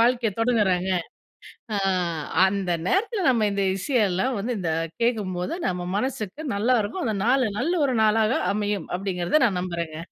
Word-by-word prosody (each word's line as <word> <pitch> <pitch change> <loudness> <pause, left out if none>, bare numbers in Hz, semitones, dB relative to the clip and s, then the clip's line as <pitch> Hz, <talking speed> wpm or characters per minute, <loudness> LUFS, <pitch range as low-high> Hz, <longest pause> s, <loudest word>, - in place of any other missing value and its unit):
வாழ்க்கையை 235 -2 +2
தொடங்குறாங்க 200 -6 +2 0.9
ஆ - - +1 0.7
அந்த 190 -2 0 0.2
நேரத்தில 405 -1 0
நம்ப 235 -4 +2
இந்த 200 0 0
இசையெல்லாம் 215 +1 +1
வந்து 235 +4 -2
இந்த 170 -3 -1 0.3
கேட்கும்போது 195 - -1
நம்ம 180 -1 -3
மனசுக்கு 225 0 -3
நல்லாருக்கும். 230 - +1
அந்த 215 -2 0
நாள் 255 +2 +3
நல்ல 315 +8 0
ஒரு 260 -3 0
நாளாக 220 +2 +3 0.2
அமையும் 205 -3 -2
அப்டிங்கிறத, 185 - 0
நான் 195 -6 0
நம்புறேங்க. 170 -3 -4
210 Hz, 135 wpm, -24 LUFS, 185-245 Hz, 0.9 s, நாள்